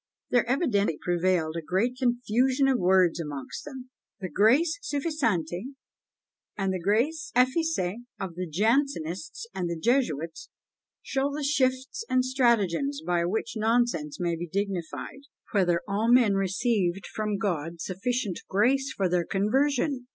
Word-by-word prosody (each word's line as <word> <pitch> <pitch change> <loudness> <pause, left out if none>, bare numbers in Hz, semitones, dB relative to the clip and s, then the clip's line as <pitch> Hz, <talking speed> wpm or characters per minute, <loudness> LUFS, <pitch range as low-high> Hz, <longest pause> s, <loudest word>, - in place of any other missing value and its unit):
There 245 -1 +2
evidently 210 - +1
prevailed 175 -2 0
a 165 - -2
great 190 +10 0
"confusion 250 +2 +2
of 265 -2 +2
words" 180 -2 +3
among 145 -4 -5
them! 260 -3 -9 0.3
The 185 -3 -5
grace 265 - +3
suffisante 265 - -2 0.8
and 195 -2 0
the 185 - -2
grace 240 - 0
efficace 255 - +1 0.2
of 190 -3 -4
the 180 +1 -4
Jansenists 220 - 0
and 175 -2 -2
the 170 - -3
Jesuits 165 - 0 0.5
show 275 +1 0
the 290 +1 -4
shifts 265 - 0
and 255 0 +2
stratagems 195 - +1
by 175 -1 +1
which 205 +6 -2
nonsense 220 -9 0
may 175 -1 0
be 175 +1 -5
dignified. 195 - -4 0.3
"Whether 175 -5 +2
all 210 +4 +1
men 240 -5 +5
received 195 -1 0
from 210 -1 -1
God 170 -4 -2
sufficient 200 +2 -2
grace 265 +7 +2
for 195 - +2
their 180 -1 +1
conversion!" 255 +5 +1
210 Hz, 135 wpm, -27 LUFS, 175-255 Hz, 0.8 s, men